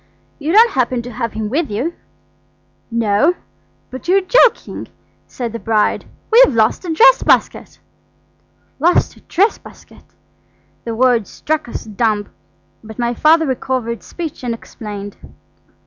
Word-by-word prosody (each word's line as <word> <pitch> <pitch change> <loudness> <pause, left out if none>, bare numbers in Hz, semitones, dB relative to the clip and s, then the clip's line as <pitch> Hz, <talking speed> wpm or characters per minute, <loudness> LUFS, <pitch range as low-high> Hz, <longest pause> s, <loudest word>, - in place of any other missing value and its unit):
"You 305 +2 -2
don't 455 +5 +6
happen 250 -1 -1
to 245 - -8
have 230 -1 -4
him 220 -1 -3
with 290 +7 -1
you?" 245 +12 -2 1.0
"No; 230 - +2 0.6
but 260 +6 -9
you're 380 +2 +4
joking," 455 +5 +2 0.4
said 235 -3 -5
the 230 - -5
bride. 220 -2 0 0.3
"We've 460 - +6
lost 220 +8 +2
a 340 - -3
dress - - +5
basket." - - 0 1.0
Lost 345 +5 +2
a - - -18
dress 400 +6 +1
basket! - - -16 0.8
The 230 -1 -4
words 240 -3 +2
struck 310 -4 -3
us - - -6
dumb, 215 -1 -1 0.5
but 220 -1 -11
my 240 0 -1
father 320 +6 +4
recovered 250 - -3
speech 320 - -7
and 235 -2 -2
explained. 205 -3 -9
245 Hz, 135 wpm, -17 LUFS, 225-320 Hz, 1.0 s, don't